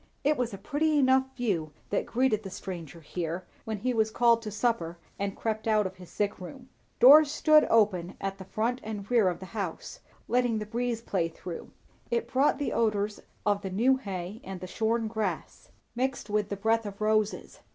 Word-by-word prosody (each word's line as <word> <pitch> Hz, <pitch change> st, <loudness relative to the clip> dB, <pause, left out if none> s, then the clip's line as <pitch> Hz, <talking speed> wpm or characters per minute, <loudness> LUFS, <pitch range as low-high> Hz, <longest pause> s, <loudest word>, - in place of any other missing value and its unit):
It 300 Hz, +2 st, +3 dB
was 245 Hz, -3 st, -1 dB
a 195 Hz, -, -6 dB
pretty 305 Hz, +7 st, 0 dB
enough 265 Hz, -1 st, +4 dB
view 175 Hz, -, -1 dB, 0.2 s
that -, -, 0 dB
greeted 235 Hz, -3 st, +1 dB
the 195 Hz, -, -7 dB
stranger 170 Hz, -5 st, -7 dB
here, 170 Hz, +3 st, -4 dB, 0.2 s
when 220 Hz, -1 st, -3 dB
he 250 Hz, +5 st, -1 dB
was 220 Hz, -1 st, +2 dB
called 235 Hz, +1 st, +4 dB
to 220 Hz, -, -5 dB
supper 210 Hz, -6 st, -1 dB, 0.2 s
and 200 Hz, 0 st, -2 dB
crept 220 Hz, 0 st, -2 dB
out 215 Hz, -2 st, +3 dB
of 190 Hz, 0 st, -5 dB
his 180 Hz, -2 st, -12 dB
sick 205 Hz, 0 st, -2 dB
room. 250 Hz, +8 st, -10 dB, 0.3 s
Doors 290 Hz, +4 st, +9 dB
stood 305 Hz, 0 st, +5 dB
open 195 Hz, -5 st, +2 dB
at 195 Hz, 0 st, -4 dB
front 240 Hz, +4 st, 0 dB
and 210 Hz, -2 st, -5 dB
rear 225 Hz, -6 st, +5 dB
of 175 Hz, -, -4 dB
the 190 Hz, -, -8 dB
house, 195 Hz, -7 st, -5 dB, 0.3 s
letting 245 Hz, -2 st, +2 dB
the 210 Hz, -, -3 dB
breeze 235 Hz, +1 st, -2 dB
play 180 Hz, -7 st, 0 dB
through. 165 Hz, +1 st, -8 dB, 0.4 s
It 470 Hz, -1 st, 0 dB
brought 270 Hz, +3 st, +3 dB
the 290 Hz, -, -2 dB
odours 210 Hz, -2 st, 0 dB, 0.2 s
of 205 Hz, -1 st, +2 dB
the 195 Hz, -, -4 dB
new 240 Hz, +8 st, +3 dB
hay 195 Hz, -2 st, -6 dB
and 190 Hz, -1 st, -6 dB
the 185 Hz, -, -6 dB
shorn 225 Hz, +4 st, 0 dB
grass, 220 Hz, -1 st, -4 dB, 0.3 s
mingled 255 Hz, -3 st, -2 dB
with 210 Hz, -1 st, 0 dB
the 200 Hz, -, -3 dB
breath 225 Hz, +2 st, +1 dB
of 200 Hz, 0 st, -8 dB
roses. 215 Hz, 0 st, 0 dB
215 Hz, 195 wpm, -28 LUFS, 195-245 Hz, 0.4 s, Doors